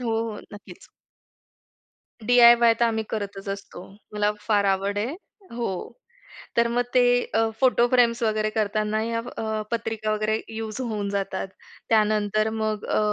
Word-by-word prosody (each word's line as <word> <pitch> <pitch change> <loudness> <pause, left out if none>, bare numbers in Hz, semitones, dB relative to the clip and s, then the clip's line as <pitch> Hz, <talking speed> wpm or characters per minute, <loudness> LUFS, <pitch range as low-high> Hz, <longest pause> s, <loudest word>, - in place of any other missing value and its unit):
हो, 245 - -3 0.2
हो, 210 - -8
नक्कीच. 205 - -13 1.4
डीआयवाय 235 -1 +7
तर - - +5
आम्ही 220 -1 0
करतच 200 -2 -5
असतो. 195 -2 -7 0.3
मला 210 0 +1
फार 205 -2 +2
आवड 195 +1 0
आहे. 240 +9 -2 0.4
हो, 230 -6 -4 0.6
तर 235 0 +3
मग 240 +1 +1
ते 250 - +6 0.3
अ, 225 0 +3
फोटो 250 -2 +4
फ्रेम्स 240 -1 +3
वगैरे 215 -1 +1
करतांना 215 0 -1
या 230 +1 -2
अ, 220 -2 -4
पत्रिका 220 -2 -2
वगैरे 215 +1 0
यूज 220 +2 -5
होऊन 215 -5 -3
जातात. 195 -1 -3 0.4
त्यानंतर 215 0 +2
मग 215 -1 -2
अ, - - 0
215 Hz, 140 wpm, -24 LUFS, 210-235 Hz, 1.4 s, डीआयवाय